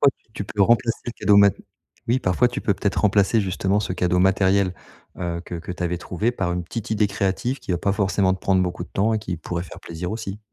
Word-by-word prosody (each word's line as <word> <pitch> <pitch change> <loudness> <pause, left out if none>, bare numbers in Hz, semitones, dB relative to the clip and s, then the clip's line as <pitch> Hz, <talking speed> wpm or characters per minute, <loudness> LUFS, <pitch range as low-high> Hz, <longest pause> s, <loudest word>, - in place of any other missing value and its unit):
contre 140 -1 +4 0.2
tu 100 - -4
peux 100 0 0
remplacer 115 +2 +3
le 120 - -3
cadeau 105 -3 +3
mat 100 -2 +6 0.5
oui, 125 +2 +3
parfois 95 +7 +2
tu 120 - -5
peux 100 - +2
peut-être 100 +1 -1
remplacer 100 +2 +3
justement 95 0 0
ce 90 - -3
cadeau 90 0 +1
matériel, 95 0 +3 0.5
heu, 85 -1 -3
que 85 - -6
que 85 +2 -7
tu 90 - -6
avais 90 0 -1
trouvé 105 +8 -1
par 95 -6 -2
une 90 -1 -3
petite 110 +4 -6
idée 105 -1 +2
créative 100 +6 -1
qui - - -8
va 90 - +2
pas 100 - +1
forcément 100 -2 +2
te 95 - -3
prendre 95 -1 +2
beaucoup 90 -1 -3
de - - -9
temps 110 +3 +1
et 110 - +1
qui 90 -5 -4
pourrait 85 +2 -4
faire 90 - -10
plaisir 85 +2 -6
aussi. 110 -3 -5
95 Hz, 245 wpm, -23 LUFS, 90-105 Hz, 0.5 s, mat